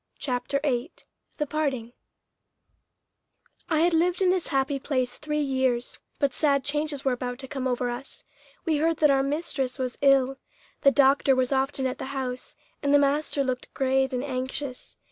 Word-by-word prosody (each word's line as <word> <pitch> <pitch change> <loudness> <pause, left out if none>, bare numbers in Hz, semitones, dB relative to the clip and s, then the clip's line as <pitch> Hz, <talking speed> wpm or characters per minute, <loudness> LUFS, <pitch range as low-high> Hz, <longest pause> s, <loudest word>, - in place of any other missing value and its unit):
CHAPTER 270 0 -1
VIII 265 +2 0 0.5
THE 300 - 0
PARTING 270 -6 -2 1.8
I 315 -2 +2
had 345 +1 +3
lived 345 +2 +2
in 375 -2 +4
this 370 -2 +1
happy 270 +1 0
place 255 -3 -2
three 300 0 -1
years, 260 -3 0 0.2
but 280 -3 +1
sad 280 -3 +2
changes 295 0 -2
were 265 - +3
about 245 0 -3
to 265 0 -8
come 265 -2 -3
over 250 0 0
us. 245 +3 -5 0.4
We 320 -3 +2
heard 325 +1 +1
that 300 -2 +5
our 270 -1 +3
mistress 275 -2 -2
was 255 -2 -3
ill. 270 -1 +4 0.4
The 275 - +7
doctor 275 -1 +4
was 255 0 +1
often 270 0 +1
at 255 0 -2
the - - -4
house, 255 -1 -4 0.3
and 280 - +1
the 290 - +7
master 285 0 +1
looked 255 -1 -3
grave 265 0 +2
and 250 0 -2
anxious. 260 0 -4
270 Hz, 170 wpm, -26 LUFS, 255-295 Hz, 1.8 s, The